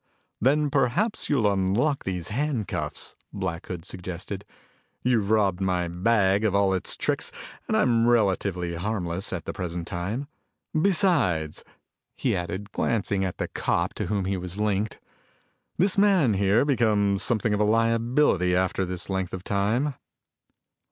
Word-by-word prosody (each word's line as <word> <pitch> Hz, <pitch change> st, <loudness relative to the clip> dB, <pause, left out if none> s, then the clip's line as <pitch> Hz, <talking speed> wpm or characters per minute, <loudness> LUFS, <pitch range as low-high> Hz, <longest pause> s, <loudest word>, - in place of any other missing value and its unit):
"Then 145 Hz, +4 st, +3 dB
perhaps 160 Hz, -, +1 dB
you'll 135 Hz, -7 st, +2 dB
unlock 105 Hz, +10 st, +1 dB
these 90 Hz, -3 st, -3 dB
handcuffs," 125 Hz, -, -2 dB, 0.2 s
Black 90 Hz, -4 st, -4 dB
Hood 85 Hz, -2 st, -6 dB
suggested. 95 Hz, +2 st, -6 dB, 0.6 s
"You've 115 Hz, -5 st, +2 dB
robbed 100 Hz, -4 st, +2 dB
my 90 Hz, -2 st, 0 dB
bag 95 Hz, +3 st, +2 dB
of 105 Hz, -3 st, +1 dB
all 100 Hz, -1 st, +3 dB
its 95 Hz, -, -1 dB
tricks -, -, 0 dB, 0.4 s
and -, -, +1 dB
I'm 115 Hz, -2 st, +3 dB
relatively 95 Hz, -6 st, +1 dB
harmless 95 Hz, 0 st, -3 dB
at 90 Hz, -4 st, -4 dB
the -, -, -4 dB
present 85 Hz, -2 st, -4 dB
time. 100 Hz, +10 st, -3 dB, 0.5 s
Besides," 155 Hz, -, +1 dB, 0.5 s
he -, -, +1 dB
added, 95 Hz, +4 st, -4 dB
glancing 100 Hz, -4 st, 0 dB
at 95 Hz, -2 st, -3 dB
the -, -, -2 dB
cop -, -, -1 dB
to -, -, -3 dB
whom 100 Hz, -3 st, -1 dB
he 95 Hz, 0 st, -1 dB
was 90 Hz, +1 st, -6 dB
linked, 105 Hz, 0 st, -1 dB, 0.8 s
"this 190 Hz, +2 st, +2 dB
man 190 Hz, -, +4 dB
here 100 Hz, +5 st, +3 dB
becomes 105 Hz, -7 st, +2 dB
something 110 Hz, -1 st, +1 dB
of 105 Hz, -, 0 dB
a -, -, +4 dB
liability 115 Hz, -3 st, +2 dB
after 95 Hz, 0 st, 0 dB
this 90 Hz, -1 st, -3 dB
length 95 Hz, -2 st, -2 dB
of 90 Hz, -, -8 dB
time." 110 Hz, +10 st, 0 dB
100 Hz, 145 wpm, -26 LUFS, 90-120 Hz, 0.8 s, man